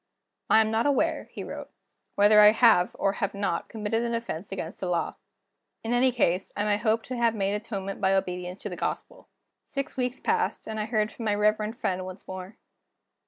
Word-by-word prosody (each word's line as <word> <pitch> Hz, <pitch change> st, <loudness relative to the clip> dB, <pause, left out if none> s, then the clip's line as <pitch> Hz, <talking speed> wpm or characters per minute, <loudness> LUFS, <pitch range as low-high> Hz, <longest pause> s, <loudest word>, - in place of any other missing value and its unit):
"I 220 Hz, -, +7 dB
am 220 Hz, 0 st, 0 dB
not 225 Hz, +4 st, +2 dB
aware," 285 Hz, -, +1 dB
he -, -, -6 dB
wrote, -, -, -7 dB, 0.5 s
"whether 210 Hz, +1 st, +6 dB
I 210 Hz, 0 st, +9 dB
have, 220 Hz, -6 st, +5 dB
or 195 Hz, -, +1 dB
have 200 Hz, 0 st, -2 dB
not, 200 Hz, 0 st, -2 dB
committed 220 Hz, 0 st, -1 dB
an 235 Hz, 0 st, -1 dB
offense 200 Hz, -6 st, -5 dB
against 185 Hz, -2 st, -5 dB
the 185 Hz, -, -3 dB
Law. 175 Hz, -1 st, 0 dB, 0.7 s
In 230 Hz, +1 st, -1 dB
any 255 Hz, +1 st, +4 dB
case, 190 Hz, -6 st, 0 dB
I 205 Hz, -, +1 dB
may 205 Hz, -1 st, +2 dB
hope 220 Hz, 0 st, +1 dB
to 255 Hz, -, -5 dB
have 230 Hz, -1 st, +2 dB
made 200 Hz, -1 st, 0 dB
atonement 200 Hz, -2 st, -4 dB
by 190 Hz, 0 st, +3 dB
obedience 180 Hz, 0 st, -3 dB
to 210 Hz, -, -3 dB
the 180 Hz, -, -6 dB
Gospel." -, -, -5 dB, 0.3 s
Six 275 Hz, 0 st, -5 dB
weeks 250 Hz, 0 st, -1 dB
passed, 450 Hz, 0 st, 0 dB
and 220 Hz, 0 st, -4 dB
I 210 Hz, -, -1 dB
heard 215 Hz, -1 st, 0 dB
from 230 Hz, -, -7 dB
my 210 Hz, -1 st, +2 dB
reverend 215 Hz, +2 st, +1 dB
friend 185 Hz, -6 st, -1 dB
once 185 Hz, +1 st, -9 dB
more. 185 Hz, +3 st, -8 dB
210 Hz, 205 wpm, -27 LUFS, 195-230 Hz, 0.7 s, I